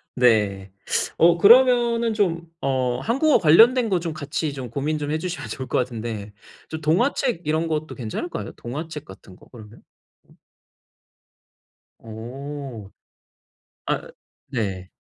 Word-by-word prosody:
네. 105 Hz, -6 st, +2 dB, 0.5 s
어 170 Hz, 0 st, +5 dB
그러면은 235 Hz, +1 st, +5 dB
좀 170 Hz, -5 st, 0 dB, 0.2 s
어 130 Hz, -2 st, 0 dB
한국어 275 Hz, -, +3 dB
관련된 225 Hz, +9 st, +6 dB
거 185 Hz, -3 st, +2 dB
좀 165 Hz, -1 st, -3 dB
같이 150 Hz, 0 st, -3 dB
좀 130 Hz, -3 st, -6 dB
고민 145 Hz, +6 st, -2 dB
좀 145 Hz, 0 st, -3 dB
해 155 Hz, -, +1 dB
주시면 180 Hz, +2 st, -5 dB
좋을 130 Hz, -2 st, -5 dB
것 -, -, 0 dB
같은데. 115 Hz, -4 st, -4 dB, 0.4 s
저 160 Hz, -, -4 dB
동화책 175 Hz, -, +1 dB
이런 160 Hz, +2 st, 0 dB
것도 155 Hz, -1 st, -3 dB
괜찮을까요? 130 Hz, -, -5 dB
동화책 150 Hz, +5 st, -7 dB
같은 95 Hz, -1 st, -14 dB
거 -, -, -19 dB
그러면? 110 Hz, -3 st, -13 dB, 0.5 s
어? -, -, -22 dB, 1.7 s
어. 120 Hz, 0 st, -8 dB, 1.0 s
아 -, -, -2 dB, 0.4 s
네. 95 Hz, -7 st, -3 dB
150 Hz, 230 characters per minute, -23 LUFS, 120-175 Hz, 1.7 s, 관련된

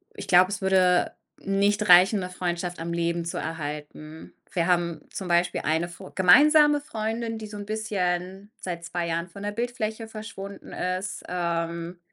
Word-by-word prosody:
ich -, -, -8 dB
glaube, 185 Hz, +2 st, +5 dB
es -, -, -4 dB
würde 185 Hz, -2 st, +3 dB, 0.3 s
nicht 200 Hz, +1 st, +1 dB
reichen, 185 Hz, +4 st, +7 dB
‘ne 180 Hz, -, -4 dB
Freundschaft 175 Hz, -1 st, -3 dB
am 170 Hz, +1 st, -4 dB
Leben 170 Hz, 0 st, -1 dB
zu 170 Hz, -, -4 dB
erhalten. 155 Hz, 0 st, -6 dB, 0.2 s
Wir 170 Hz, -2 st, +1 dB
haben 170 Hz, -3 st, +1 dB
zum 190 Hz, -, -5 dB
Beispiel 175 Hz, 0 st, +1 dB
eine 160 Hz, +3 st, 0 dB
Fr 185 Hz, +2 st, -11 dB
gemeinsame 295 Hz, -, +6 dB
Freundin, 225 Hz, -2 st, -3 dB
die 215 Hz, -, -7 dB
so 210 Hz, 0 st, -8 dB
‘n 205 Hz, -, -6 dB
bisschen 195 Hz, -2 st, -2 dB
seit 170 Hz, -2 st, -5 dB
2 170 Hz, 0 st, -3 dB
Jahren 170 Hz, +1 st, -2 dB
von 200 Hz, +4 st, -11 dB
der 205 Hz, -, -2 dB
Bildfläche 230 Hz, -1 st, -3 dB
verschwunden 205 Hz, -3 st, -9 dB
ist, 185 Hz, +2 st, -3 dB
ähm, 170 Hz, 0 st, -3 dB
180 Hz, 165 wpm, -26 LUFS, 170-205 Hz, 0.3 s, reichen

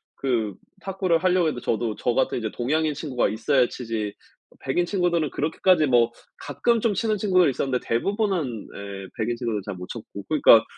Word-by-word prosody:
그 115 Hz, -7 st, -1 dB, 0.3 s
탁구를 185 Hz, -3 st, 0 dB
하려고 180 Hz, -2 st, +3 dB
해도 125 Hz, -, -4 dB
저도 110 Hz, -1 st, -1 dB
저 120 Hz, -, 0 dB
같은 130 Hz, -, +1 dB
이제 110 Hz, -2 st, -2 dB
동양인 155 Hz, +5 st, 0 dB
친구가 140 Hz, -4 st, -1 dB
있어야 125 Hz, +4 st, +2 dB
치지 110 Hz, -5 st, -4 dB, 0.5 s
백인 175 Hz, +6 st, 0 dB
친구들은 175 Hz, -5 st, 0 dB
그렇게까지 160 Hz, +1 st, +2 dB
뭐 120 Hz, -2 st, +4 dB, 0.3 s
가끔 225 Hz, -, 0 dB
좀 225 Hz, -1 st, +1 dB
치는 215 Hz, +2 st, 0 dB
친구들이 185 Hz, -5 st, +3 dB
있었는데 130 Hz, -1 st, -2 dB
대부분은 175 Hz, -, -1 dB
네 100 Hz, -1 st, -7 dB
백인 120 Hz, +1 st, -1 dB
친구도 115 Hz, -4 st, -2 dB
잘 100 Hz, -, -5 dB
못 90 Hz, 0 st, -8 dB
쳤고 105 Hz, -3 st, -8 dB
그러니까 140 Hz, -7 st, +7 dB
135 Hz, 390 characters per minute, -24 LUFS, 115-175 Hz, 0.5 s, 그러니까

